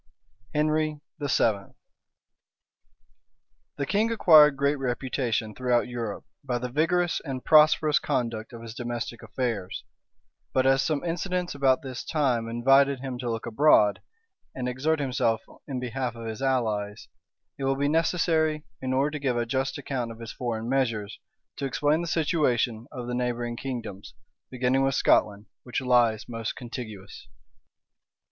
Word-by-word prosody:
HENRY 155 0 +1 0.2
VII. 145 - -3
{1488.} 105 -7 +1 2.0
The 140 - -1
king 215 +8 +1
acquired 155 -9 +7
great 140 +1 +1
reputation 125 -4 -2
throughout 125 0 +1
Europe 115 -4 -5 0.2
by 125 -3 -1
the 125 0 -5
vigorous 175 +5 +1
and 135 -4 -5
prosperous 155 -1 +5
conduct 115 -5 -2
of 115 -1 -10
his 115 -1 -8
domestic 120 -1 -5
affairs; 110 -8 -3 0.7
but 130 - +2
as 135 0 +4
some 155 0 -1
incidents 180 +1 -2
about 135 -2 +2
this 130 -2 -6
time 125 -7 0
invited 135 +3 +3
him 130 -2 -5
to 120 -1 -3
look 115 -1 -3
abroad, 115 -4 +4 0.5
and 125 -1 -3
exert 145 +6 0
himself 125 -5 0 0.2
in 130 -3 -3
behalf 125 -1 -3
of 115 0 -8
his 110 +1 -5
allies, 110 -6 -1 0.5
it 135 - -2
will 135 0 +2
be 140 +1 +1
necessary, 160 -1 +1 0.2
in 130 0 -2
order 140 +3 +2
to 150 - -4
give 130 -4 0
a 120 - 0
just 135 +5 -1
account 130 -5 -3
of 115 - -10
his 115 -1 -7
foreign 115 -2 -3
measures, 115 -6 -1 0.4
to 140 - -3
explain 145 +4 +1
the 170 - -4
situation 130 -8 0
of 125 -4 -6
the 125 - -4
neighboring 120 -1 -2
kingdoms, 115 -5 -6 0.3
beginning 130 +1 +1
with 135 -1 +1
Scotland, 105 0 +2 0.2
which 125 - -3
lies 120 -4 +2
most 115 -2 -4
contiguous. 110 -5 -8
130 Hz, 150 wpm, -26 LUFS, 115-145 Hz, 2.0 s, acquired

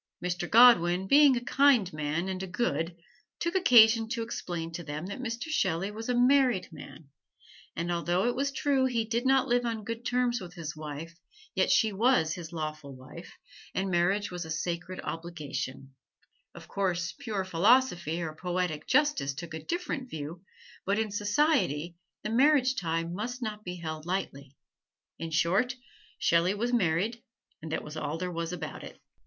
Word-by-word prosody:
Mr. 175 0 -3
Godwin, 190 -7 +6
being 280 +3 +6
a - - -2
kind 260 - +4
man 155 +4 -2
and 190 -1 -3
a 190 - -4
good, 170 -5 -1 0.4
took 340 0 -2
occasion 230 - +6
to 230 -1 -2
explain 175 -7 -5
to 170 +1 -6
them 150 +2 -5
that 200 +4 -6
Mr. 240 +4 -4
Shelley 190 - 0
was 225 +3 -7
a 250 - +2
married 250 -4 +3
man, 155 -1 -12 0.7
and 170 +1 -2
although 175 +3 0
it 245 0 +1
was 280 +2 0
true 275 -1 +1
he 235 -3 0
did 235 +3 -1
not 270 0 +4
live 245 -1 +2
on 230 -2 -3
good 230 +3 -5
terms 245 -1 0
with 180 0 -9
his 160 -4 -6
wife, 155 +2 -7 0.4
yet - - +1
she 220 -3 +3
was 200 -7 +3
his 170 -2 -8
lawful 155 -4 -5
wife, 130 +7 -12 0.4
and 190 0 -1
marriage 190 +4 +1
was 180 0 -4
a 160 - -9
sacred 170 +3 -3
obligation: 140 -5 -5 0.6
of - - -11
course, 180 -3 -1
pure 215 -8 -3
philosophy 180 - +2
or 155 -2 -4
poetic 175 -2 -3
justice 290 - +2
took 165 +1 -7
a 160 - -6
different 335 -7 -3
view, 160 0 -7 0.4
but 200 +2 0
in 220 -1 -1
society 205 - +1 0.3
the 215 - -3
marriage 265 +1 +4
tie 165 -5 -1
must 215 +9 -5
not 215 -2 -5
be 180 -2 -5
held 160 -2 -6
lightly. 140 -7 -4 0.6
In 165 - -4
short, 190 +11 +1 0.4
Shelley 170 +4 +2
was 240 +4 -2
married 210 +2 +1 0.4
and 160 0 -7
that - - -2
was 150 +1 -9
all 155 0 -3
there 180 +1 -3
was 165 0 -3
about 180 - -6
it. - - -11
185 Hz, 170 wpm, -29 LUFS, 165-240 Hz, 0.7 s, Godwin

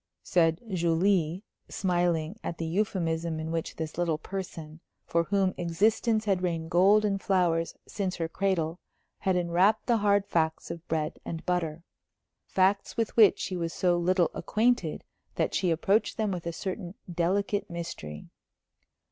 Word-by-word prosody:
said 165 -2 +2
Julie, 175 +1 +1 0.3
smiling 175 0 0
at 170 - -4
the 165 - -3
euphemism 165 -3 -1
in 160 +1 -4
which 165 -1 -3
this 160 +1 -5
little 165 -3 +1
person, 165 -3 -7 0.3
for 170 0 +1
whom 195 0 +1
existence 215 +6 +1
had 195 -3 +1
rained 165 -3 -2
gold 200 +5 +5
and 195 -1 0
flowers 170 -4 +1
since 190 -3 -2
her 165 -2 -2
cradle, 175 -2 -1 0.4
had 190 -1 +1
enwrapped 180 +4 +2
the 235 -2 +3
hard 205 -1 +3
facts 160 -4 -1
of 170 0 -8
bread 155 -1 -2
and 165 -1 -6
butter 170 -3 -1 0.6
facts 195 +1 +1
with 225 -2 -1
which 215 -4 +7
she 185 - -3
was 170 -1 -3
so 180 -1 +2
little 175 0 +2
acquainted 220 -7 0 0.3
that - - 0
she 185 - +1
approached 195 +6 +1
them 215 -3 0
with 175 -2 -4
a - - -1
certain 180 +1 -5 0.2
delicate 200 +4 0
mystery. 165 - -6
175 Hz, 150 wpm, -28 LUFS, 165-195 Hz, 0.6 s, which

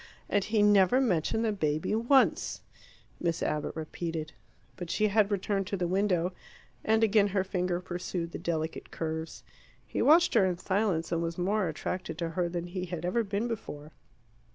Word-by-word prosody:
"And 205 - +2
he 215 0 +2
never 205 +3 +5
mentioned 220 -1 +1
the 220 - +2
baby 155 -3 -1
once," 240 +5 +2 0.6
Miss 170 -1 -1
Abbott 150 -1 -2
repeated. 160 0 -4 0.4
But 175 -2 -7
she 215 +3 +2
had 205 0 +3
returned 195 -1 -1
to 200 - -2
the 175 -1 -1
window, 185 -1 +1 0.5
and 220 +1 +3
again 210 -1 +4
her 195 -1 0
finger 180 -2 -1
pursued 175 -1 -4
the - - -6
delicate 160 -1 -3
curves. 160 0 -5 0.4
He - - -3
watched 335 +4 +5
her - - +5
in 185 -2 +1
silence, 185 -3 0
and 170 -1 0
was 165 0 -3
more 190 +2 +1
attracted 165 +1 -4
to 170 -1 -2
her 175 +1 -1
than 175 0 -3
he 180 +1 -4
had 175 -1 -5
ever 230 +6 +1
been 205 +3 -2
before. 155 -10 -6
185 Hz, 175 wpm, -29 LUFS, 170-205 Hz, 0.6 s, never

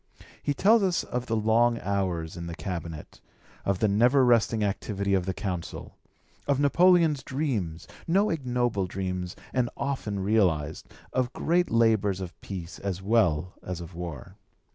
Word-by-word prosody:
He 145 - -1
tells 215 +8 +5
us 185 -3 +1
of 125 +1 -4
the 115 - 0
long 115 +2 +3
hours 90 -5 -2
in 85 -1 -6
the 85 - -5
Cabinet, 85 -5 -6 0.4
of 100 -1 0
the 110 - +2
never 120 +6 +4
resting 115 -2 +3
activity 100 0 -1
of 95 -1 +1
the 95 - 0
Consul, 90 -5 -5 0.5
of 140 -1 +2
Napoleon's 165 0 +4
dreams, 115 - -3 0.2
no 195 +5 +3
ignoble 125 - 0
dreams 90 -1 -4 0.2
and 125 -2 +1
often 130 -8 -2
realised, 90 -7 +1 0.2
of 130 -2 0
great 175 +2 +1
labours 110 -4 +2
of 90 -2 -6
peace 90 -3 -7
as 95 -2 -4
well 90 -6 +2
as 90 -1 -5
of 85 +1 -9
war. 85 -6 -7
105 Hz, 150 wpm, -27 LUFS, 90-125 Hz, 0.5 s, tells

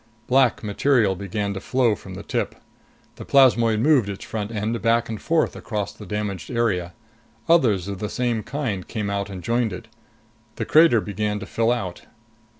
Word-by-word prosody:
Black 130 -2 +3
material 105 -1 +2
began 100 +1 -3
to 95 - -5
flow 125 +1 +1
from - - -9
the - - -8
tip. - - -2 0.6
The - - -7
plasmoid 120 -5 +4
moved 130 -6 +4
its 100 - -6
front 105 -2 -4
end 110 0 -2
back 115 0 +2
and 110 -2 -5
forth 165 -1 +1
across 105 -3 -4
the 105 - -12
damaged 105 -2 -4
area. 95 -8 0 0.5
Others 115 - +3
of 100 -2 -5
the 105 - -3
same 120 -3 -1
kind 120 -9 -4
came 105 -3 -3
out 100 0 -2
and 95 -3 -8
joined 115 -1 0
it. 90 +5 -8 0.7
The - - -3
crater 155 -8 +5
began 105 +1 -2
to - - -5
fill 115 +3 +1
out. 95 -8 -4
110 Hz, 175 wpm, -23 LUFS, 100-120 Hz, 0.7 s, crater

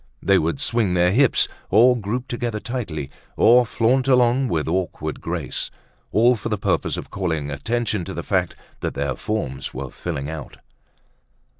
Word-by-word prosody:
They 100 +1 +4
would 85 - -1
swing 115 -9 +1
their 90 0 +4
hips, 130 +5 +4 0.2
or 120 +6 +6
group 120 +3 -3
together 120 -2 -3
tightly, 85 - -4 0.3
or 120 +1 +6
flaunt 125 +5 +2
along 125 0 +4
with 80 -9 -1
awkward 90 +2 -2
grace, - - -3 0.4
all 120 +3 +5
for 115 - -5
the 105 - 0
purpose - - 0
of - - -7
calling 80 -6 -2
attention 105 - -1
to - - -6
the - - -4
fact - - 0 0.2
that - - -3
their 70 0 -1
forms 70 -15 -3
were 65 0 -5
filling 75 -6 -4
out. 80 -2 -7
105 Hz, 160 wpm, -22 LUFS, 80-120 Hz, 0.4 s, or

